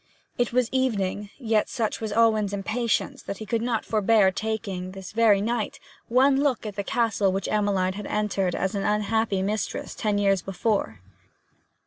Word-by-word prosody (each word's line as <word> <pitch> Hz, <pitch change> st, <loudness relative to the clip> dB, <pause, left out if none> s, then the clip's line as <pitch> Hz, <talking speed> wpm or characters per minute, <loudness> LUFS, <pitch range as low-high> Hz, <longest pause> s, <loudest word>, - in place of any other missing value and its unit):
It 245 Hz, -, 0 dB
was 250 Hz, -1 st, +2 dB
evening; 210 Hz, -6 st, -1 dB
yet 220 Hz, -5 st, +1 dB
such 225 Hz, -4 st, -2 dB
was 220 Hz, -2 st, -3 dB
Alwyn's 215 Hz, -2 st, +3 dB
impatience 215 Hz, +3 st, -1 dB
that 200 Hz, -, -6 dB
he 220 Hz, -, -7 dB
could 225 Hz, +2 st, -1 dB
not 235 Hz, -1 st, -1 dB
forbear 215 Hz, -2 st, +3 dB
taking, 195 Hz, -3 st, -4 dB
this 190 Hz, -1 st, -8 dB
very 215 Hz, -3 st, +4 dB
night, 230 Hz, 0 st, -2 dB, 0.3 s
one 270 Hz, +3 st, +4 dB
look 275 Hz, -6 st, 0 dB
at 210 Hz, -2 st, -5 dB
the 200 Hz, -, -2 dB
castle 210 Hz, -3 st, +1 dB
which 195 Hz, +1 st, -2 dB
Emmeline 200 Hz, -3 st, +1 dB
had 205 Hz, +1 st, -6 dB
entered 200 Hz, -3 st, 0 dB
as 190 Hz, +2 st, -1 dB
unhappy 210 Hz, 0 st, 0 dB
mistress 210 Hz, +2 st, -3 dB
ten 210 Hz, -2 st, -1 dB
years 195 Hz, -2 st, +2 dB
before. 195 Hz, -, -2 dB
210 Hz, 160 wpm, -25 LUFS, 195-230 Hz, 0.3 s, very